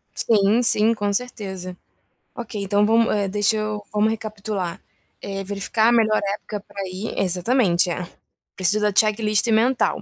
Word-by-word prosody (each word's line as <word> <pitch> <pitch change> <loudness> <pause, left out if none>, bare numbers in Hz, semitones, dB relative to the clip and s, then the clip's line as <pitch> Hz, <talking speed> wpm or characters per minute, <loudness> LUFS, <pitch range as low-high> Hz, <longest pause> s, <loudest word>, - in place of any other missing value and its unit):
Sim, 215 +1 +2
sim, 225 -1 +3
com 205 -2 -2
certeza. 190 -6 -5 0.6
Ok, 220 -4 -6
então 205 +1 +2
vamos 225 +1 +3
eh, 205 -1 0
deixa 205 +2 +1
eu 215 -1 -3
vamos 210 +1 +2
recapitular. 210 -4 -5 0.4
Eh, 195 0 -5
verificar 205 +3 0
a - - +3
melhor 220 -3 +3
época 210 0 -7
pra 200 - -8
ir, 185 +4 -5
exatamente. 185 0 +2 0.7
Preciso 195 +3 +2
da 210 -1 +1
checklist 215 0 +2
mental, 235 +4 +2
210 Hz, 145 wpm, -22 LUFS, 195-220 Hz, 0.7 s, sim